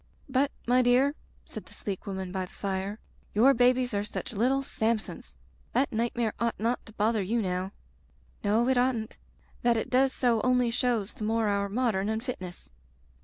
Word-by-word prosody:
"But, 270 +1 +2 0.2
my 250 +1 +4
dear/' 250 +3 +4 0.3
said - - -9
the - - -14
sleek 200 0 -5
woman 190 -2 -4
by 185 0 -2
the - - -21
fire, 195 +1 -3 0.4
"your 255 +6 +6
babies 250 0 +3
are 200 0 0
such 210 - -5
little 255 +6 +2
Samsons! 215 - -2 0.4
That 275 - +1
nightmare 230 0 0
ought 235 -1 -1
not 230 +3 0
to 220 - -12
bother 215 +1 +1
you 220 +5 0
now. 185 -2 -1 0.7
"No. 220 +4 +2
It 260 -1 +3
oughtn't. 245 -3 0 0.4
That 240 -1 +3
it 225 - -3
does 260 +1 +4
so 240 -4 +2
only 250 -2 +2
shows 235 -4 0
the - - -7
more 225 +1 +1
our 200 0 0
modern 215 -3 0
unfitness." 220 - -5
225 Hz, 170 wpm, -28 LUFS, 200-250 Hz, 0.7 s, your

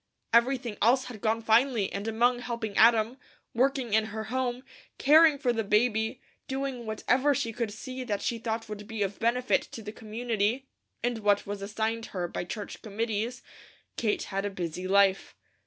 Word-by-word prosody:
Everything 235 -2 +2
else 255 +4 +4
had 230 -5 -9
gone 225 0 0
finely 225 -1 +3
and 200 +2 -4
among 240 +2 +2
helping 235 -4 -4
Adam, 230 +2 +4 0.3
working 260 -2 +1
in 220 0 +4
her 220 0 -5
home, 255 -1 -1 0.3
caring 310 +1 +6
for 255 -4 +1
the 225 -1 -1
baby, 220 +3 +1 0.3
doing 265 -3 -3
whatever 255 +6 +2
she 230 -2 -2
could 230 -1 -2
see 255 +4 -6
that 210 -5 -2
she 235 - -2
thought 225 0 -3
would 210 -1 -7
be 220 -2 -2
of 200 0 -4
benefit 245 +2 +2
to 225 - -10
the 210 - -6
community, 225 +2 -2 0.4
and 240 -1 0
what 205 -1 +2
was 200 0 -5
assigned 220 +3 -2
her 180 -2 -3
by - - -4
church 205 +3 -7
committees, 225 +3 -3 0.5
Kate 215 -3 0
had 195 0 -3
a 205 - -1
busy 180 -1 -4
life. 195 0 +3
225 Hz, 170 wpm, -28 LUFS, 210-245 Hz, 0.5 s, caring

